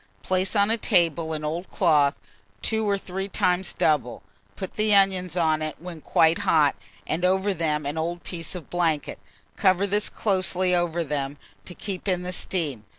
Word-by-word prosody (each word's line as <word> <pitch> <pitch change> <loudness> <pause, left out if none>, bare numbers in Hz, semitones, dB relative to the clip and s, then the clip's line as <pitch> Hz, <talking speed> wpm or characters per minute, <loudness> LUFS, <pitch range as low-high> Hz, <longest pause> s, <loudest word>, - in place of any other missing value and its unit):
Place 185 +3 0
on 205 +1 +3
a 230 - 0
table 170 -6 +2
an 155 -1 -3
old 170 +4 -4
cloth, 150 -6 +2 0.4
2 220 -1 +1
or 200 - +2
3 195 +1 -5
times 180 -1 +1
double; 130 -8 0 0.3
put 190 - -6
the 215 -1 +3
onions 185 -3 +2
on 160 -2 +2
it 155 0 -3
when 170 -2 -9
quite 165 +2 +3
hot, 150 -3 +3 0.3
and 165 +3 -2
over 190 +2 +2
them 155 -4 -1
an 150 +3 -3
old 170 +2 -3
piece 170 +1 -6
of 170 -6 -9
blanket; 165 -4 0 0.4
cover 190 -1 +3
this 205 +1 0
closely 185 -2 +1
over 175 -1 0
them, 145 -1 -3 0.3
to 180 - -8
keep 195 -1 -5
in 180 -2 0
the 180 0 -3
steam. 150 - -2
175 Hz, 175 wpm, -25 LUFS, 160-190 Hz, 0.4 s, on